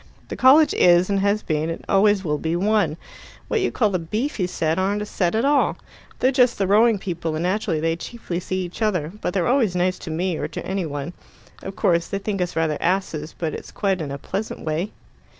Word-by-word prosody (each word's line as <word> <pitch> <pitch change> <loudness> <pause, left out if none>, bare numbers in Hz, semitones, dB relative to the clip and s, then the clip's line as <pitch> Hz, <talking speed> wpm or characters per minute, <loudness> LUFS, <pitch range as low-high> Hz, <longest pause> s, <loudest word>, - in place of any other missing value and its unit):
"The - - -4
college 280 +4 +6
is, 175 +2 +4
and 200 - +2
has 200 +2 +1
been, 155 0 -1
and 165 - -6
always 200 0 +3
will 150 -2 0
be, 160 +2 -1
one. 195 -4 +1 0.5
What 445 - +1
you 380 - 0
call 215 -4 +1
the 185 - 0
beefy 210 - -2
set 160 -1 -1
aren't 200 +2 0
a - - -5
set 180 -2 -1
at 225 +4 +1
all. 285 0 +2 0.4
They're 255 - +2
just 250 -2 +3
the 195 - +1
rowing 215 +3 +4
people, 170 -4 -4
and 160 - -2
naturally 185 -3 0
they 165 +1 0
chiefly 180 -3 -5
see 185 +1 -3
each 175 +5 -8
other; 180 -8 0
but 180 - -2
they're 185 - +1
always 240 -7 +2
nice 180 +1 0
to 170 - -8
me 170 +1 -1
or - - -2
to - - -7
any 190 -3 -2
one. 145 +3 -5 0.5
Of 195 - -7
course, 170 -4 +1
they 195 - -3
think 195 -1 -3
us 175 - -2
rather 160 -2 0
asses, 170 -4 -1
but 160 -3 -2
it's - - -8
quite 195 -4 -1
in 150 - -4
a 140 - -4
pleasant 195 +9 -5
way." 160 +6 -1
185 Hz, 225 wpm, -22 LUFS, 165-210 Hz, 0.5 s, college